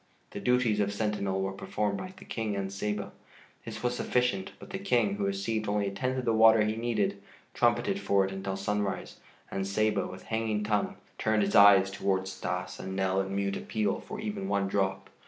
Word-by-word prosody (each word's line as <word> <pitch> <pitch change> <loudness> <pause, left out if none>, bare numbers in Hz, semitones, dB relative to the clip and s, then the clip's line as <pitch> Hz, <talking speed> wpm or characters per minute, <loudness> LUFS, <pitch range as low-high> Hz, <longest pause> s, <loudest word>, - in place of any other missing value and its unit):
The - - -5
duties 120 0 +2
of 100 -1 +1
sentinel 100 -2 -1
were 95 - -1
performed 100 +1 -2
by 185 - -6
the 195 - -12
King 110 -3 -3
and 100 0 -3
Saba. 105 +1 -3 0.5
This 110 -1 -7
was 125 0 +1
sufficient, 125 +11 0
but 190 - -12
the 195 - -3
King, 120 - +2
who 100 - -1
received 100 +2 -1
only 105 0 +1
a - - -7
tenth 125 +6 -2
of 130 - -2
the 115 - +2
water 110 0 +6
he 105 +1 0
needed, 115 -3 -1 0.3
trumpeted - - +2
for 100 -1 +2
it 95 - -4
until 95 0 -4
sunrise, 100 0 -2 0.3
and 95 0 -2
Saba, 105 0 +1
with 95 0 -9
hanging 110 -2 -1
tongue, 105 -1 0 0.2
turned 110 -1 +2
his 100 - -1
eyes 100 -1 +7
towards 95 -1 -1
Stas 90 -1 -4
and 95 0 -5
Nell 95 0 +1
in 95 0 -4
mute 100 0 0
appeal 110 -2 -1
for 215 - -8
even 210 -2 -4
one 100 - +1
drop. 95 -1 -1
105 Hz, 200 wpm, -29 LUFS, 95-110 Hz, 0.5 s, eyes